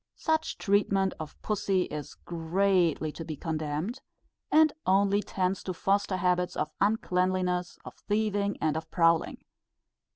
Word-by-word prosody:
Such 320 0 -1
treatment 195 -2 +2
of 155 -2 -8
pussy 195 -3 +1
is 150 -4 -7
greatly 170 -2 +1
to 165 - -7
be 155 -1 -5
condemned, 160 - -3 0.5
and 310 -1 +5
only 200 +2 +3
tends 185 -1 -1
to 185 - -3
foster 195 +1 +1
habits 180 0 +1
of 150 - -1
uncleanliness, 185 -3 +1
of - - -8 0.2
thieving, 205 -1 0
and 155 -2 0
of 160 - -4
prowling. 165 -2 +2
185 Hz, 130 wpm, -28 LUFS, 165-200 Hz, 0.5 s, and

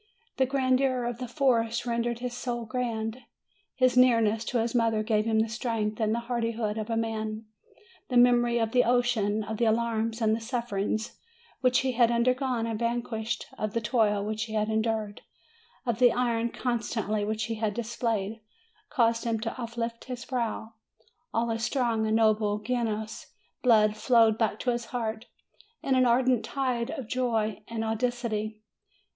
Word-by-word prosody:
The 260 -1 +3
grandeur 260 -1 +1
of 240 0 -3
the 250 - -4
forest 235 -3 +1
rendered 235 0 -1
his 250 -1 -3
soul 240 -1 -3
grand; 225 -1 -3 0.6
his 255 -1 +3
nearness 230 -3 +4
to 245 - -1
his 230 0 0
mother 225 -3 +2
gave 215 -1 +1
him 225 -1 +1
the 225 - 0
strength 220 -2 -2
and 215 -1 +1
the 235 +1 0
hardihood 230 -2 -2
of 215 +1 -5
a 225 - 0
man; 220 -1 -3 0.6
the 250 - +2
memory 240 -1 +5
of 225 -1 0
the 250 +1 +4
ocean, 230 -3 +1
of 215 +1 -5
the 235 - +2
alarms 225 0 0
and 220 -1 +2
the - - -4
sufferings 225 -2 -3 0.4
which 255 -1 +3
he 265 -1 0
had 235 -1 +4
undergone 250 0 +1
and 225 -2 -3
vanquished, 235 -1 -2
of 215 -1 -2
the - - +3
toil 210 -3 +1
which 215 +1 -2
he 220 - -8
had 215 0 +1
endured, 220 -1 -1 0.6
of 235 -2 -1
the 245 -2 +6
iron 235 -2 0
constancy 225 -4 -2
which 215 +1 -1
he 225 0 -2
had 215 -2 -2
displayed, 225 -2 -2 0.5
caused 230 -4 +2
him 230 -2 0
to 225 +3 -4
uplift 230 0 -4
his 245 -2 -6
brow. 230 -3 -3 0.6
All 230 +1 0
his 225 0 -2
strong 230 -3 +1
and 220 - +1
noble 215 -2 +3
Genoese 220 -1 -3 0.3
blood 215 -4 +4
flowed 225 -1 +4
back 215 -2 +1
to 250 - +1
his 240 0 -3
heart 225 -1 -4 0.6
in 275 - +1
an 255 -1 +4
ardent 245 0 +3
tide 255 -4 -1
of 270 -8 -5
joy 225 -4 -1
and 225 -1 -3
audacity. 220 -2 -2
230 Hz, 170 wpm, -28 LUFS, 220-245 Hz, 0.6 s, the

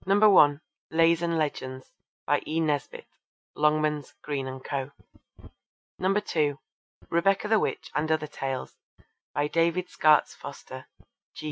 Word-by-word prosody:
(1) 195 -7 +5 0.3
Lays 165 +1 +3
and 170 -1 0
Legends. 130 -4 -3 0.3
By - - +2
E. 160 +2 -1
Nesbit. 150 -3 -2 0.5
(Longmans, 150 -1 +1
Green 140 -3 -3
and 130 0 -7
Co.) 135 -1 -3 1.1
(2) 165 -7 +1 0.5
Rebecca 195 +5 +2
the 220 0 +4
Witch 160 - -3
and 155 +1 0
Other 155 -1 +1
Tales. 135 -3 -5 0.6
By 145 0 +1
David 170 +3 0
Skaats 155 -1 +4
Foster. - - -10
155 Hz, 115 wpm, -27 LUFS, 145-170 Hz, 1.1 s, 1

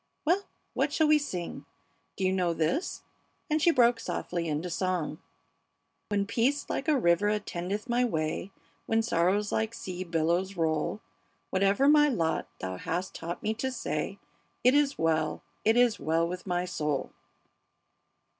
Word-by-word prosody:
Well, 365 +6 +2 0.3
what - - +1
shall 315 - +3
we 305 0 +5
sing? 180 - -5 0.5
Do 195 - -3
you 185 - +2
know 180 -3 +1
this?" 215 - -1 0.5
And 305 +1 +2
she 340 - +5
broke 240 -6 +4
softly 170 -1 -3
into 155 +3 -2
song: 175 -3 -2 0.9
"When 200 -1 +1
peace 245 +7 +1
like 275 - -2
a 305 -3 +4
river 195 -2 +3
attendeth 205 0 -3
my 240 +1 +2
way; 160 -3 -1 0.4
When 225 0 +2
sorrows 205 0 +1
like 220 +1 -1
sea 185 0 -5
billows 175 +3 0
roll; 160 +5 0 0.5
Whatever 195 +7 +3
my 295 0 +6
lot 165 - 0
Thou 95 0 -4
hast 175 - -3
taught 170 +1 -6
me 215 - +1
to 260 +4 -2
say, - - -3 0.5
It 250 - +6
is 285 -1 +3
well, 160 -1 0 0.2
it 220 +2 +4
is 245 -2 +4
well 160 +3 +1
with 180 +2 -6
my 180 0 0
soul." 150 -5 -2
190 Hz, 155 wpm, -29 LUFS, 170-240 Hz, 0.9 s, my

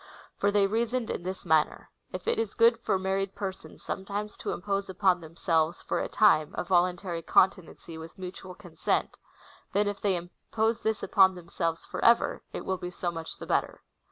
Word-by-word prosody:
For 200 - +1
they 205 -1 +3
reasoned 230 +3 0
in - - -3
this 185 +2 -5
manner: 160 -2 +1
" - - -44
If 185 -1 -7
it - - +1
is 225 -3 -2
good 230 0 +5
for 195 - +1
married 190 +1 -1
j)crsons 190 -2 -6
sometimes 205 +2 -4
to - - -3
impose 200 +1 -2
upon 185 -1 +2
themselves 165 0 0
/or - - +1
a - - -3
time 155 -8 +4
a. - - 0
voluntary 175 -1 +1
continency 170 -2 +1
with 165 +3 -10
mutual 185 0 -8
consent, 175 -5 -2 0.6
then, 205 +1 +2
if 205 -1 -3
they 200 -3 +2
impose 220 +6 -2
this 220 -1 -1
upon 190 -1 +5
themselves 170 -1 -3
for - - -5
ever, 235 0 +4
it - - -6
will 190 - -1
be 180 - -5
so 175 -1 -3
much 165 -1 -7
the - - -8
better." - - -1
190 Hz, 185 wpm, -28 LUFS, 175-205 Hz, 0.6 s, good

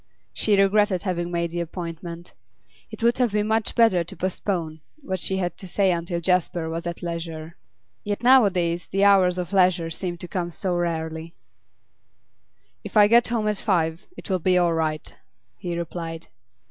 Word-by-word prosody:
She 205 -2 +2
regretted 195 -1 +3
having 175 -3 -2
made 170 -1 -2
the 175 - -3
appointment; 170 0 -6 0.6
it - - -8
would 235 +2 +3
have 245 -5 +2
been 210 0 +1
much 220 0 0
better 225 -7 +4
to 170 - -8
postpone 175 -4 -3 0.2
what 190 -5 -3
she 190 +2 0
had 180 -2 -2
to 190 - -6
say 190 +1 +2
until 170 0 -2
Jasper 175 -2 0
was 165 +1 -4
at 170 0 -6
leisure. 165 -1 -5 0.5
Yet 205 +2 -3
nowadays 185 -9 +4
the 195 +1 0
hours 190 -3 +5
of 180 +1 -4
leisure 180 -3 +3
seemed 175 +1 -4
to 180 - -5
come 175 -2 -3
so 180 +2 -3
rarely. 165 -1 -3 1.5
'If - - -3
I 210 - +8
get 235 +2 +5
home 225 -2 -1
at 210 -1 0
five, 170 -4 -1
it'll 185 -2 -2
be 180 +2 +2
all 175 -1 +3
right,' 155 -2 -2 0.4
he 175 -1 -4
replied. 165 -1 -6
175 Hz, 170 wpm, -24 LUFS, 170-195 Hz, 1.5 s, I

